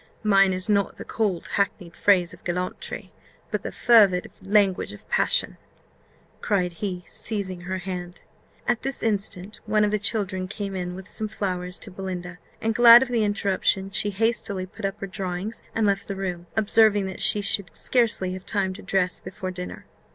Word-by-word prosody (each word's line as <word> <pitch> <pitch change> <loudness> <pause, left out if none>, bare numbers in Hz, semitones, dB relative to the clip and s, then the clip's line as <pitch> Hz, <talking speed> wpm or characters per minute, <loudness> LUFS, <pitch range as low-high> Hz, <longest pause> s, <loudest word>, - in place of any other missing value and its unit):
Mine 195 -2 +5
is 185 +1 -2
not 200 -2 +1
the - - -9
cold, 205 -6 -1
hackneyed 185 -4 -2
phrase 180 -4 +3
of - - -15
gallantry, 180 +1 -4 0.4
but - - -1
the - - -5
fervid 205 -7 +4
language 195 - +2
of 105 - -14
passion," - - +2 0.8
cried 180 -4 0
he, 180 0 -4
seizing 195 -5 -4
her 185 +1 -3
hand. 180 -1 -6 0.5
At 240 -2 +1
this 270 -1 -4
instant 200 -2 -1
one 210 0 +3
of 205 - 0
the 210 - +1
children 200 -3 -1
came 200 0 -5
in 180 -1 -4
with 190 +1 -9
some 215 - -3
flowers 180 -4 -3
to 205 - -10
Belinda; 180 -2 -6 0.2
and, 225 0 0
glad 235 +1 +9
of 260 - -6
the 235 -3 +1
interruption, 195 -1 +1
she 205 - +1
hastily 205 -2 -1
put 200 +3 -8
up 195 +2 -3
her - - -2
drawings 190 +2 -5
and 225 - +2
left 200 -1 0
the 200 - -4
room, 180 -3 -4
observing 215 -1 +4
that 190 -1 -6
she 210 - +6
should 200 -2 +2
scarcely 220 -7 +1
have 185 0 -7
time 195 -2 -1
to 205 - -10
dress 180 -2 0
before 185 0 -6
dinner. 180 0 -7
195 Hz, 180 wpm, -25 LUFS, 185-210 Hz, 0.8 s, glad